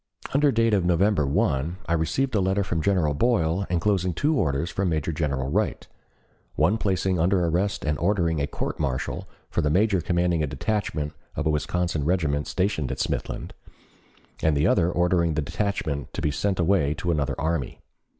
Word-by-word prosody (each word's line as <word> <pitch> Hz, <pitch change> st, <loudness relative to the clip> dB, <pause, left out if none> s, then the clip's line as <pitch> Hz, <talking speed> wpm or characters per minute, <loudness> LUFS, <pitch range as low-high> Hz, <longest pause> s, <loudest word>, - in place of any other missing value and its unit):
Under 145 Hz, +1 st, +4 dB
date 115 Hz, -1 st, +2 dB
of 100 Hz, -3 st, +3 dB
November 90 Hz, -2 st, +2 dB
1, 80 Hz, -1 st, 0 dB
I 80 Hz, -, -1 dB
received 125 Hz, +12 st, 0 dB
a 105 Hz, -, +2 dB
letter 95 Hz, +2 st, +1 dB
from 85 Hz, -4 st, -2 dB
General 90 Hz, -5 st, +2 dB
Boyle 95 Hz, 0 st, +1 dB
enclosing 90 Hz, 0 st, +1 dB
two 150 Hz, -, +1 dB
orders 80 Hz, -, 0 dB
from 95 Hz, -2 st, 0 dB
Major 80 Hz, 0 st, -1 dB
General 70 Hz, -4 st, -2 dB
Wright, 105 Hz, +5 st, -1 dB, 0.7 s
one 110 Hz, +3 st, +2 dB
placing 95 Hz, -3 st, 0 dB
under 90 Hz, +1 st, +2 dB
arrest 90 Hz, +4 st, 0 dB
and 75 Hz, 0 st, 0 dB
ordering 85 Hz, -4 st, +1 dB
a 70 Hz, -, 0 dB
court -, -, -4 dB
martial 65 Hz, -2 st, -2 dB, 0.2 s
for -, -, 0 dB
the 75 Hz, -, +1 dB
major 95 Hz, +3 st, +2 dB
commanding 85 Hz, 0 st, +1 dB
a 75 Hz, -, 0 dB
detachment 75 Hz, 0 st, -2 dB, 0.2 s
of 80 Hz, -, -2 dB
a 80 Hz, -, +3 dB
Wisconsin 80 Hz, +1 st, -1 dB
regiment 75 Hz, -3 st, 0 dB
stationed 90 Hz, -8 st, -1 dB
at -, -, -3 dB
Smithland, -, -, -3 dB, 0.9 s
and 80 Hz, -2 st, +2 dB
the 75 Hz, -, +2 dB
other 90 Hz, -2 st, +3 dB
ordering 85 Hz, -2 st, +2 dB
the 80 Hz, -, +1 dB
detachment 80 Hz, -5 st, -2 dB
to -, -, -3 dB
be 75 Hz, -, +2 dB
sent 95 Hz, +6 st, -1 dB
away 85 Hz, -5 st, +2 dB
to 85 Hz, +3 st, -1 dB
another 70 Hz, -4 st, -1 dB
army. 80 Hz, -4 st, -2 dB
85 Hz, 180 wpm, -25 LUFS, 75-100 Hz, 0.9 s, Under